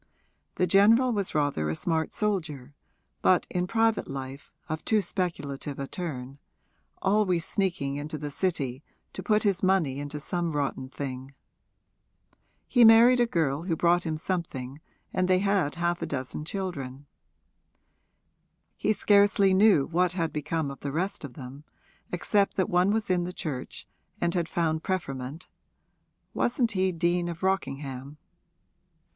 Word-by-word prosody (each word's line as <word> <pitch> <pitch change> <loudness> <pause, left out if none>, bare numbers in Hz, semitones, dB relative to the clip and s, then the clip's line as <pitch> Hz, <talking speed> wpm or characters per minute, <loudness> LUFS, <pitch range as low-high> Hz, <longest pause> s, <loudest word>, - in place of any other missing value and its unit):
The 180 - +2
general 220 +8 +5
was 200 -5 -2
rather 145 - 0
a 80 - -1
smart 160 - -1
soldier, 160 -10 -2 0.5
but 185 -2 +4
in 180 0 -1
private 225 +1 +1
life 135 0 -7 0.2
of 155 0 -4
too 220 - +2
speculative 145 -8 -3
a 140 - -3
turn 135 -5 -6 0.6
always 190 -4 +2
sneaking 160 -8 -1
into 150 +2 -5
the 145 0 -5
City 140 -6 -2 0.3
to - - -5
put 215 -1 +2
his 195 -3 +1
money 185 -8 +2
into 145 +1 -5
some 170 +2 -2
rotten 140 -2 -2
thing. 135 -1 -6 1.3
He 245 -2 +5
married 230 +3 +8
a 240 - +4
girl 160 -5 0
who 170 -3 0
brought 175 +2 +3
him 160 -2 -2
something 155 -6 -4 0.3
and 185 -1 +1
they 185 0 +4
had 195 -6 +1
half 175 0 -1
a - - -2
dozen 140 +2 -4
children. 145 -8 -5 1.7
He 215 - +1
scarcely 200 -2 +4
knew 190 -7 +5
what 175 +1 +1
had 165 -3 -2
become 155 -1 -2
of 135 - -10
the 140 - -4
rest 185 +6 -2
of 130 -4 -8
them, 135 +1 -9 0.5
except 200 +3 +1
that 190 - 0
one 180 +2 +3
was 215 -2 0
in 180 -1 +2
the 180 +1 -5
Church 140 -8 -5 0.3
and 170 0 0
had 170 -3 -1
found 160 -2 0
preferment 145 -4 -4 0.9
wasn't 240 -1 +1
he 190 -1 +1
Dean 175 0 0
of 170 +1 -7
Rockingham? 140 -7 -2
170 Hz, 145 wpm, -27 LUFS, 140-190 Hz, 1.7 s, married